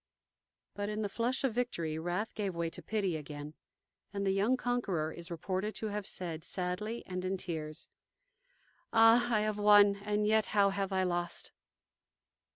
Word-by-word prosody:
But 205 0 -3
in 215 +1 -2
the 205 - -1
flush 240 +3 0
of 265 -4 +1
victory 170 -10 -2
wrath 175 +6 -2
gave 200 -4 -3
way 170 -1 -1
to - - -7
pity 200 -6 -1
again, 150 0 -7 0.6
and 200 0 -2
the 195 - +3
young 205 +7 +2
conqueror 200 -12 -1
is 170 0 -8
reported 185 +5 -3
to 220 - -2
have 205 -1 -3
said, 165 -3 -3
sadly 190 +5 -3
and 185 -1 -4
in 190 +1 -1
tears: 160 -4 -4 1.0
"Ah! 230 +2 +6
I 215 -2 +3
have 215 0 -1
won, 205 -1 +7
and 210 +1 -1
yet 220 0 +3
how 200 -1 +5
have 195 0 -2
I 190 -1 +2
lost!" 175 -1 -2
200 Hz, 165 wpm, -32 LUFS, 175-215 Hz, 1.0 s, won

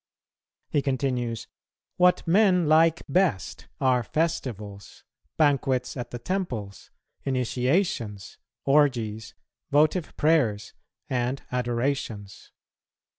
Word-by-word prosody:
He 145 - +2
continues, 125 -4 -2 0.5
"What 180 0 +3
men 180 -2 +4
like 160 +2 +4
best 155 - 0
are 130 -2 +3
festivals, 110 - -4 0.3
banquets 135 -4 +1
at 125 -3 -5
the 120 - -6
temples, 120 - -4 0.3
initiations, 125 - -1 0.3
orgies, 120 -7 +1 0.3
votive 155 +4 +2
prayers, 125 -11 +1 0.3
and 125 +1 -2
adorations. 120 -4 -3
130 Hz, 80 wpm, -26 LUFS, 115-155 Hz, 0.5 s, men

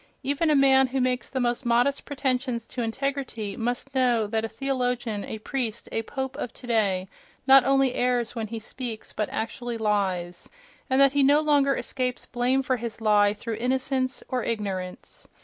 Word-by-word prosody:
Even 285 +4 +1
a 300 - +4
man 265 -1 +5
who 265 +1 -2
makes 250 -1 0
the 265 - -2
most 240 +1 0
modest 245 +3 +2
pretensions 255 -4 -1
to 250 - -5
integrity 240 -3 -3
must 245 +3 -3
know 245 -4 +2
that 220 +1 -1
a 225 - -2
theologian, 245 -4 -2
a 220 - -5
priest, 235 0 -3
a 225 - 0
pope 265 +3 -5
of 240 - -4
today 205 -6 0 0.4
not 270 -1 +8
only 270 -2 +3
errs 245 -2 0
when 225 -2 -3
he 230 +2 -5
speaks, 225 0 -6
but 210 - -2
actually 240 +1 -3
lies—and 210 - -2
that 275 -1 +6
he 285 - +3
no 285 +2 +5
longer 290 -3 +3
escapes 250 -1 -2
blame 255 +2 +1
for 255 -1 0
his 230 -1 -6
lie 210 -2 +4
through 225 0 -5
"innocence" 260 +2 -1
or 255 -3 -2
"ignorance." 195 -5 -4
245 Hz, 170 wpm, -26 LUFS, 225-265 Hz, 0.4 s, not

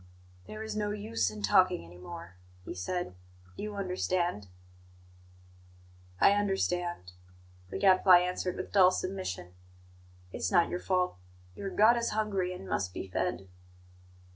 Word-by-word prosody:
"There 215 0 -7
is 220 - -5
no 210 -1 -1
use 210 - -1
in 105 -1 -8
talking 95 -4 +3
any 90 +1 -14
more," 90 0 -9 0.3
he - - -5
said. 175 - -3 0.4
"You 210 0 -5
understand?" 180 - -1 1.7
"I - - +6
understand," 180 - -1 0.6
the - - -4
Gadfly 185 -1 +6
answered, 180 0 -1
with 185 - -6
dull 190 -3 +7
submission. 185 - -4 0.8
"It's - - -2
not 175 -3 +4
your 180 - -3
fault. 180 - 0 0.4
Your 195 - -5
God 220 +5 +5
is 235 - 0
hungry, 195 -4 0
and 185 +1 -8
must 90 -2 -2
be - - -5
fed." 95 - -2
180 Hz, 135 wpm, -30 LUFS, -, 1.7 s, dull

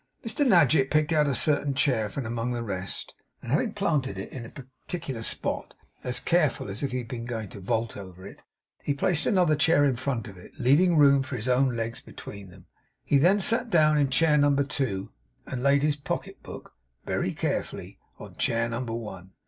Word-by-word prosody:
Mr 230 +6 +1
Nadgett 160 - +4
picked 155 +1 +2
out 150 -2 +3
a 140 - 0
certain 145 0 +1
chair 125 -6 +1
from 130 +4 -5
among 115 +2 -2
the 120 -1 -3
rest, 95 -3 -4 0.3
and 120 - -8
having 190 - +1
planted 150 - -1
it 95 - -6
in 130 - -7
a 115 - -9
particular 130 0 -7
spot, - - -4 0.3
as 125 -1 -1
carefully 155 - +1
as 100 - -6
if 140 - -2
he 130 - -2
had 120 -2 -5
been 115 0 -6
going 115 -3 -4
to - - -10
vault 110 +4 -2
over 95 -2 -10
it, 100 - -12 0.6
placed 170 0 +2
another 180 -8 +3
chair 150 0 +4
in 135 -3 +2
front 125 -2 -3
of 95 -3 -11
it; 90 - -15
leaving 165 +7 +4
room 140 -2 +6
for 130 0 -5
his 120 0 -4
own 130 0 +2
legs 115 0 -4
between 100 -2 -10
them. 90 0 -16 0.4
He 140 - +3
then 185 +8 +4
sat 230 +4 +3
down 155 -5 +4
in 140 -2 +2
chair 150 +2 +3
number 140 -1 +3
two, 115 -9 -3 0.3
and 125 - -5
laid 140 +1 +3
his 150 -1 +1
pocket 140 - -5
book, - - -10 0.3
very - - -1
carefully, - - -4 0.2
on - - -12
chair 115 0 +1
number 115 0 -4
one. 95 -5 -7
130 Hz, 200 wpm, -27 LUFS, 115-150 Hz, 0.6 s, room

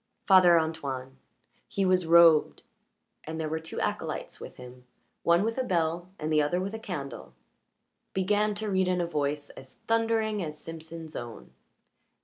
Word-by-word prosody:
Father 180 -3 +7
Antoine 135 -5 -4 0.5
he 195 - -1
was 185 -2 +2
robed, 165 -2 +6 0.6
and 160 +1 -5
there 160 - -2
were 160 +1 -2
two 160 0 -7
acolytes - - -3
with - - -9
him, 125 0 -12 0.4
one 170 +2 +3
with 230 +3 -1
a - - +1
bell 175 -3 -1
and 155 +1 -2
the 155 - +4
other 150 +5 0
with 195 +3 -3
a 220 - -5
candle 150 - -7 0.8
began 205 +2 +1
to 210 0 -3
read 190 -1 +2
in 180 0 +1
a 175 - +1
voice 145 -2 -2
as 135 0 -13
thundering 225 -2 +1
as 150 -2 -6
Simpson's 160 0 -9
own. 120 -2 -8
165 Hz, 160 wpm, -28 LUFS, 150-190 Hz, 0.8 s, Father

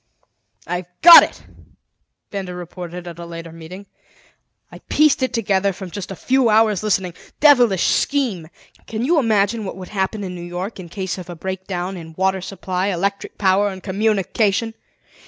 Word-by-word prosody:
"I've 180 0 -4 0.2
got 340 0 +12
it!" - - -4 0.9
Benda 190 -3 -5
reported 175 0 -8
at 170 -1 -9
a 170 - -7
later 165 -1 -8
meeting. 165 +4 -10 0.9
"I - - -11
pieced 305 -2 +3
it 260 - 0
together 200 -5 +1
from 185 -1 -9
a 195 -1 -6
few 255 +4 +2
hours 215 -2 +3
listening. 190 -4 0 0.3
Devilish 245 - +5
scheme! 240 - 0 0.4
"Can 225 +2 -3
you 325 +3 +3
imagine 220 -2 +1
what 190 - -6
would 185 -1 -9
happen 200 +1 -2
in 185 -1 -5
New 175 - -8
York 175 +4 -6
in 175 -2 -9
case 190 +1 -4
of 180 - -10
a 175 - -6
break 190 +2 -6
down 185 0 -4
in 160 -2 -10
water 190 0 +1
supply, 185 0 -3
electric 200 +1 -2
power, 200 +1 +2
and 190 -1 -9
communication? 210 +2 0
190 Hz, 165 wpm, -20 LUFS, 180-215 Hz, 0.9 s, got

